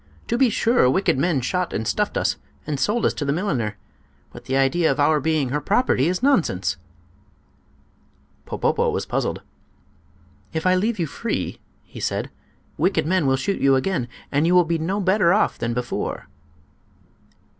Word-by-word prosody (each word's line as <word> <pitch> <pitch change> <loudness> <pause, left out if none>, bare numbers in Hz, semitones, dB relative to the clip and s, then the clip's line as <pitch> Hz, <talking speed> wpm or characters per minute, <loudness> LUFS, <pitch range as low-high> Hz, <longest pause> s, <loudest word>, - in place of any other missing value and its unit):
To 235 - +1
be 255 0 +4
sure, 225 - +3
wicked 135 -2 +1
men 155 -3 +1
shot 180 +8 -2
and 110 - -2
stuffed - - 0
us, - - 0 0.3
and 145 -2 -3
sold 225 +7 +1
us - - +2
to - - -4
the 140 - 0
milliner; 135 - -1 0.6
but - - -11
the 130 - 0
idea 140 +5 +2
of 135 - -3
our 150 +1 +4
being 150 -2 0
her 150 +3 -1
property 195 - +2
is 180 +6 -1
nonsense!" 170 - +2 1.7
Popopo - - 0
was - - -2
puzzled. - - -2 1.1
"If 160 +1 -3
I 185 - +4
leave 210 +5 +1
you 170 - 0
free," 150 - -4 0.2
he - - -12
said, - - -2 0.5
"wicked 180 +2 +2
men 170 -3 +1
will 135 0 +3
shoot 195 +10 -2
you 135 -1 +5
again, 130 -2 -1 0.2
and 145 +3 +2
you 180 - +3
will 180 -1 +6
be 165 0 -1
no 185 +6 -1
better 190 -2 +3
off 215 - +1
than 115 0 -2
before." 125 -1 -3
160 Hz, 170 wpm, -22 LUFS, 135-190 Hz, 1.7 s, will